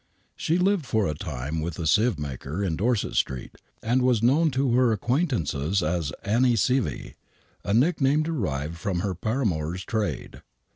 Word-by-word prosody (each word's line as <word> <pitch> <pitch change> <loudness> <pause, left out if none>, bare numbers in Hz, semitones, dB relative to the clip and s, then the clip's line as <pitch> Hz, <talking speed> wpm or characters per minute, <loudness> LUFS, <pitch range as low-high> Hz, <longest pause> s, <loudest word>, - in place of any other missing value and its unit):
She 165 - 0
lived 180 -5 +1
for 110 -2 +1
a 75 - -1
time 75 -2 -4
with 80 0 -4
a 85 - -3
sieve 105 +5 +3
maker 75 +5 -4
in 85 -5 0
Dorset 110 +4 0
Street, 65 -2 -2 0.3
and 120 +3 +2
was 125 -3 +2
known 150 +7 +4
to 135 -2 0
her 125 -1 +4
acquaintances 100 - 0
as 80 -2 -1
" - - -31
Annie 120 +4 +3
Sievy," 125 +4 0 0.5
a 100 - -2
nickname 145 +2 +3
derived 85 - -2
from 90 0 -2
her 100 -1 -1
paramour's 90 - -2
trade. 110 -2 -3
105 Hz, 160 wpm, -25 LUFS, 80-130 Hz, 0.5 s, known